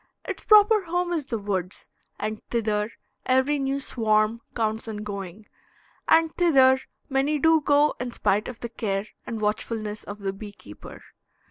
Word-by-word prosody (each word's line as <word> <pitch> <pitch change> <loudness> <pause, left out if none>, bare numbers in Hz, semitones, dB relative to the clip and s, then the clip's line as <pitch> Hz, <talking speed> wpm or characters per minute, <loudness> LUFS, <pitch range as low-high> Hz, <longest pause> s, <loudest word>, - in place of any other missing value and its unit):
Its - - -5
proper 425 -1 +6
home 350 +1 -1
is 305 -5 -2
the 230 - -2
woods, 195 -3 -4 0.3
and 215 0 -3
thither 215 -2 0 0.4
every 260 +3 +2
new 275 0 -1
swarm 220 -3 +1
counts 220 -1 -1
on 210 -1 -5
going; 200 0 -7 0.6
and 325 0 +4
thither 265 -7 +5 0.3
many 275 +2 +1
do 320 +1 +4
go 290 +1 +3
in 245 0 -3
spite 210 -2 0
of 250 -2 -8
the 235 - -4
care 200 -3 -2 0.2
and 225 -2 -4
watchfulness 215 0 -2
of 205 - -7
the 195 -2 -3
bee 205 +1 -9
keeper. 105 - -13
230 Hz, 155 wpm, -25 LUFS, 210-285 Hz, 0.6 s, proper